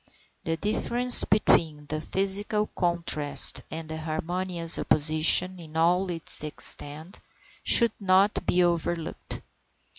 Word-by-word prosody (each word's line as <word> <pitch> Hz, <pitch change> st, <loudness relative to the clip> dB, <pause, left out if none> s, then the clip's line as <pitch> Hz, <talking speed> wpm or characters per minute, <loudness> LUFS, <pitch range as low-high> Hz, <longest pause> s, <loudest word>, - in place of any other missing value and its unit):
The 165 Hz, 0 st, -4 dB
difference 240 Hz, +5 st, +5 dB
between 155 Hz, -7 st, -1 dB
the 155 Hz, +1 st, -7 dB
physical 200 Hz, +4 st, -4 dB
contrast 170 Hz, -6 st, +1 dB
and 160 Hz, -1 st, -9 dB
harmonious 165 Hz, +2 st, -2 dB
opposition 155 Hz, +4 st, +1 dB
in 160 Hz, -1 st, -12 dB
all 180 Hz, +3 st, -1 dB
its 165 Hz, -3 st, +3 dB
extent 155 Hz, +3 st, -1 dB, 0.4 s
should 235 Hz, -2 st, +4 dB
not 195 Hz, +1 st, 0 dB
be 180 Hz, 0 st, 0 dB
overlooked. 170 Hz, -1 st, -5 dB
170 Hz, 100 wpm, -23 LUFS, 155-190 Hz, 0.4 s, difference